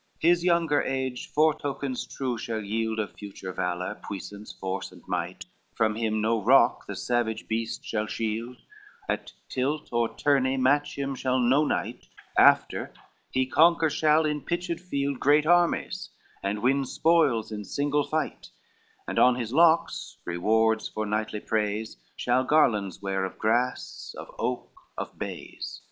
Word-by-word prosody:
XCI - - -39
"His 175 0 +3
younger 170 -4 +3
age 130 -1 -3
foretokens 145 -4 0
true 130 -3 -2
shall 110 -1 -4
yield 110 +2 -1
Of 110 -2 -3
future 95 -2 -8
valor, 90 0 -3
puissance, 100 +1 -7
force 95 0 -4
and - - -16
might, 90 0 -3 0.3
From 110 -1 +2
him 110 -1 -1
no 110 +1 +1
rock - - +4
the - - -5
savage 115 -3 -1
beast 115 0 -3
shall 110 -1 -2
shield; 115 +3 -3 0.5
At - - -3
tilt 145 +4 -2
or 120 -1 +2
tourney 135 -2 +2
match 140 +3 +2
him 140 0 -2
shall 130 0 0
no 130 +4 +3
knight: - - -3 0.3
After, - - +4 0.4
he 130 0 +1
conquer 160 +3 +4
shall 155 +1 +3
in 150 -1 -1
pitched 170 +1 -2
field 140 -6 -2
Great 150 +2 +4
armies 175 +1 +2 0.3
and 105 +2 -2
win 135 +2 +3
spoils 145 -6 +2
in 105 -1 -5
single 145 +5 0
fight, 155 +2 -3 0.6
And - - -1
on 125 0 +6
his 120 -1 -4
locks, 165 +2 +3
rewards 110 +6 +2
for 110 - -4
knightly 105 0 -2
praise, 110 0 -2 0.2
Shall 125 +1 +1
garlands 110 - +2
wear 95 -1 -1
of 95 - -5
grass, 120 +3 -1
of - - -9
oak, - - -2 0.3
of - - -6
bays. - - -6
125 Hz, 150 wpm, -27 LUFS, 110-145 Hz, 0.6 s, on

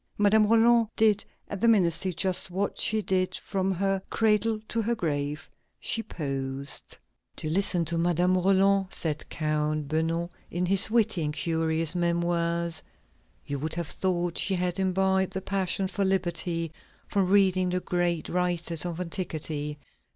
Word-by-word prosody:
Madame 210 +1 +4
Roland 230 +1 +4
did 215 -2 +3 0.2
at 200 -2 -6
the 235 - +3
ministry 185 -4 +3
just 185 +2 +1
what 195 +3 -2
she 215 0 +2
did 185 -1 0
from 195 -1 -2
her 195 +1 0
cradle 220 0 +2
to 230 - -1
her 235 +2 0
grave: 150 -6 -3 0.3
she 225 - -1
posed. 135 -6 -4 0.4
"To - - -4
listen 175 +1 +1
to 165 +1 0
Madame 175 +2 +2
Roland," 195 +1 +3
said 155 -5 -2
Count 150 -1 -1
Beugnot 165 +2 -1 0.2
in 175 +2 -1
his 195 +3 +5
witty 220 -6 +2
and 150 - -1
curious 160 -1 0
Memoirs, 170 -1 0 0.6
"you 140 -1 -4
would 155 +3 -2
have 170 -3 -4
thought 175 -2 -1
she 190 - +1
had 180 +1 -1
imbibed 190 0 +1
the 190 - -2
passion 190 0 -1
for 200 +1 -2
liberty 175 -3 -1 0.4
from 195 -2 0
reading 190 -2 +3
the 180 0 0
great 175 -3 -1
writers 175 -2 0
of 170 0 -5
antiquity.... 155 -4 -3
180 Hz, 150 wpm, -27 LUFS, 165-195 Hz, 0.6 s, his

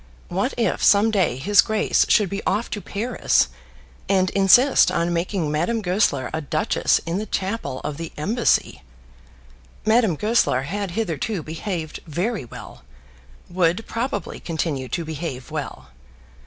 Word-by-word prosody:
What 195 +9 -1
if 225 -6 0
some 210 +2 +5
day 185 - +1
his 200 +10 +5
grace 215 -1 +1
should 210 - +4
be 200 +2 -5
off 210 +5 0
to 210 - -3
Paris 220 - 0 0.6
and 185 -2 +2
insist 245 +8 +5
on 170 +1 0
making 170 -2 -1
Madame 175 +10 0
Goesler 180 -8 +1
a 160 - -2
duchess 155 +1 +1
in 170 +3 -2
the 215 - -5
chapel 190 - -3
of 150 -1 -4
the 165 -1 -6
Embassy! 220 +10 +1 1.0
Madame 220 -5 +3
Goesler 210 - +1
had 200 +6 -3
hitherto 195 -2 -2
behaved 160 0 -5
very 180 - -2
well; - - -11 0.7
would 180 +4 0
probably 230 -5 -4
continue 155 -6 -3
to 170 +7 -3
behave 155 -5 -6
well. - - -6
185 Hz, 140 wpm, -22 LUFS, 160-215 Hz, 1.0 s, some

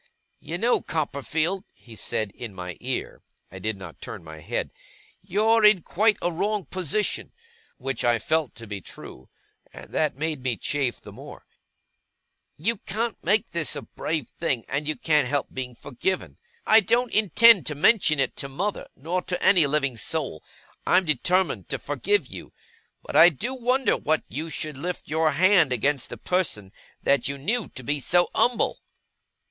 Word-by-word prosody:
'You 170 - -5
know, 235 +6 +2
Copperfield,' 160 - -2
he 115 -2 -14
said, 110 -1 -1
in 110 -2 -9
my 90 -1 -6
ear - - -4 0.3
(I 95 - -9
did 110 +2 -3
not 95 -4 -11
turn - - -8
my 80 -1 -10
head), - - -3 0.5
'you're 215 +4 +2
in 210 -5 +6
quite 215 +3 +2
a 175 - +1
wrong 200 +4 -1
position'; 185 +3 -2 0.5
which 135 -2 -3
I 120 -1 +3
felt 155 +4 -1
to 115 - -10
be 100 -2 -6
true, 65 -6 -11 0.4
and - - -12
that 155 -4 0
made 155 -2 -2
me 125 -3 -1
chafe 135 -5 -1
the - - -11
more; - - -12 1.1
'you 225 +9 0
can't 220 +4 -3
make 205 +5 +1
this 170 -3 0
a 145 - -5
brave 155 -5 -3
thing, 135 -9 -1
and 145 +1 -2
you 155 - 0
can't 150 0 +2
help 145 +1 -1
being 125 -2 -5
forgiven. 145 +10 -3 0.3
I 220 - +7
don't 235 +4 +1
intend 215 0 +6
to 150 - -3
mention 155 -2 +4
it 135 -2 +1
to 140 - -5
mother, 190 +10 -3
nor 170 +7 -2
to 180 - -4
any 175 -7 +6
living 140 -4 0
soul. 130 - -3 0.4
I'm 185 +1 +3
determined 180 +5 +1
to - - -2
forgive 415 0 0
you. - - -10 0.5
But - - -7
I 170 - +9
do 220 - -4
wonder 255 +1 +1
that 155 +1 0
you 155 +4 -4
should 155 -1 -4
lift 180 +3 -4
your 155 0 +1
hand 175 -2 +4
against 135 +3 0
a - - -6
person 145 - -1 0.3
that 140 - +2
you 140 0 -3
knew 215 - -1
to 130 - -7
be 145 +4 0
so 175 +7 +2
umble! 245 0 +2
155 Hz, 170 wpm, -25 LUFS, 130-190 Hz, 1.1 s, I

